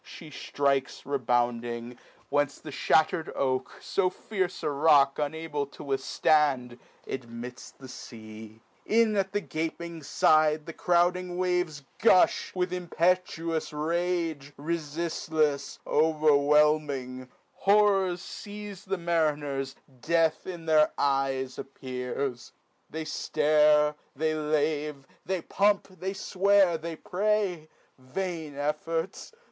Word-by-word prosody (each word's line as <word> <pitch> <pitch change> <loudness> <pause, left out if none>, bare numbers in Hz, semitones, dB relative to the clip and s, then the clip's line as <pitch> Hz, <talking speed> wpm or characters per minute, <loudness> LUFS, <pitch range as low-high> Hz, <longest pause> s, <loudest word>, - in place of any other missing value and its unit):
She 160 -4 -11
ftrikes 140 -2 -1
rebounding, 120 -2 -1 0.3
whence 145 0 +1
the 155 - -9
ihatter'd 160 +4 +2
oak, 130 -1 -1
So 190 -2 +1
fierce 185 -2 -3
a 150 - 0
rock 140 -1 +4
unable 150 -1 -2
to 140 - -12
withftand, 135 -2 +1 0.3
Admits 120 0 -7
the 135 - -14
fea; 110 -3 -11 0.3
in 225 -1 +3
at 195 -1 0
the 205 - -1
gaping 165 0 -4
fide 155 +1 +3
The 165 - -7
crouding 180 +1 +1
waves 180 -5 0 0.2
gufti 190 -4 +4
with 180 0 -1
impetuous 170 -2 0
rage, 165 -2 -2
Refiftlefs, 155 -1 -1
overwhelming; 150 -4 +2 0.2
horrors 195 -3 +3
feize 205 -1 -8
The 195 0 -2
mariners, 150 -5 -1 0.3
death 165 0 +1
in 175 -3 -7
their 155 -1 +4
eyes 135 -2 0
appears, 125 -1 -5 0.4
(pray: 160 - -5
They - - -11
ftare, 150 -1 +3 0.2
they 155 +3 0
lave, 150 -2 -1 0.2
they 190 -2 -1
pump, 200 0 +2
they 190 +1 -5
fwear, 190 -3 +3
they 165 0 -5 1.0
(Vain 160 +2 -5
efforts 160 +4 -3
155 Hz, 105 wpm, -28 LUFS, 140-175 Hz, 1.0 s, rock